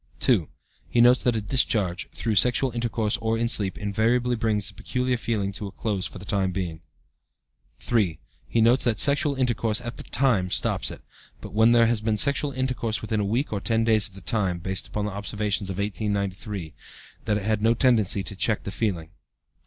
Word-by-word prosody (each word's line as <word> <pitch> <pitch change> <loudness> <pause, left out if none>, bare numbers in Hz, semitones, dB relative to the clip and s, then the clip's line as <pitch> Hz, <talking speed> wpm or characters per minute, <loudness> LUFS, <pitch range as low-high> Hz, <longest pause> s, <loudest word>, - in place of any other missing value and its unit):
"2. - - +2 0.4
He 120 - 0
notes 125 +2 +6
that 120 -2 +1
a 110 - -1
discharge 105 -5 +1
(through 115 - -3
sexual 125 +5 +3
intercourse 115 -2 -1
or 115 0 -1
in 115 +1 0
sleep) 100 -5 +1
invariably 115 +4 0
brings 110 -3 0
the - - -3
peculiar 125 0 -2
feeling 110 -4 -2
to 100 +1 -5
a - - -9
close 100 -3 -2
for - - -11
the 95 - -9
time 100 -3 0
being. 85 -4 -4 1.0
"3. 100 -10 0 0.3
He 115 - +1
notes 120 +4 +4
that 115 -3 +1
sexual 140 0 +4
intercourse 120 -3 0
at 120 -1 -7
the - - -7
time 115 -8 +2
stops - - 0
it; - - -9 0.4
but, 105 - -10
when 110 +2 +4
there 120 -1 +5
has 115 -1 +1
been 110 0 0
sexual 140 +5 +1
intercourse 130 -4 -2
within 110 0 -1
a - - 0
week 115 +6 -1
or 100 - -2
ten 115 +2 +1
days 110 -2 +4
of 95 - -18
the 95 - -11
time 95 -3 0
(based 95 +2 -4
upon 105 -1 -3
the 105 - -3
observations 100 0 -2
of 95 - -4
1893), 100 -4 -3 0.5
that 105 -1 +1
it 105 - -5
had 110 0 0
no 115 +2 +3
tendency 110 -6 +2
to 100 - -7
check 105 +2 0
the 100 - -5
feeling." 90 -8 -3
110 Hz, 200 wpm, -25 LUFS, 100-120 Hz, 1.0 s, notes